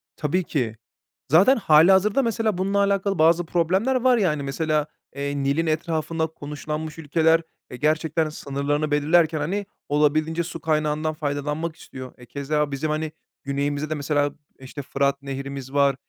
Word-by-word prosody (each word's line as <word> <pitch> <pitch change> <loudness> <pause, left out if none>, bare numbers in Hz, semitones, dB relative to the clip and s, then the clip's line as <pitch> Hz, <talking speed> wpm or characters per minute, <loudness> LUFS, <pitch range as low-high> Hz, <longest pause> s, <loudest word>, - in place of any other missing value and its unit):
Tabii 165 +4 0
ki. 125 -9 -2 0.6
Zaten 195 +12 +6
hâlihazırda 190 - +5
mesela 225 -4 0
bununla 195 +2 0
alakalı 200 -1 +1
bazı 165 +2 +4
problemler 185 +10 +1
var 255 -1 +4
yani 155 -8 +1
mesela, 150 +2 0 0.3
eee, 140 0 -3
Nil'in 140 +5 +1
etrafında 160 0 -1
konuşlanmış 150 +1 -6
ülkeler, 160 +1 +2 0.3
eee, 125 - -7
gerçekten 155 +2 +1
sınırlarını 145 +1 -2
belirlerken 155 +2 +3
hani 190 +7 -2 0.2
olabildiğince 155 +3 +2
su 165 -1 -7
kaynağından 155 0 0
faydalanmak 150 +2 -3
istiyor. 130 -4 -10
E, 125 - -14
keza 145 +3 -1
bizim, 140 +3 -2
hani, 155 0 -2 0.3
güneyimizde 145 +2 -2
de 155 - -1
mesela, 145 0 0 0.3
işte, 135 +2 -8
Fırat 140 0 0
Nehri'miz 135 -1 -6
var, 140 -2 +3
155 Hz, 140 wpm, -24 LUFS, 145-165 Hz, 0.6 s, Zaten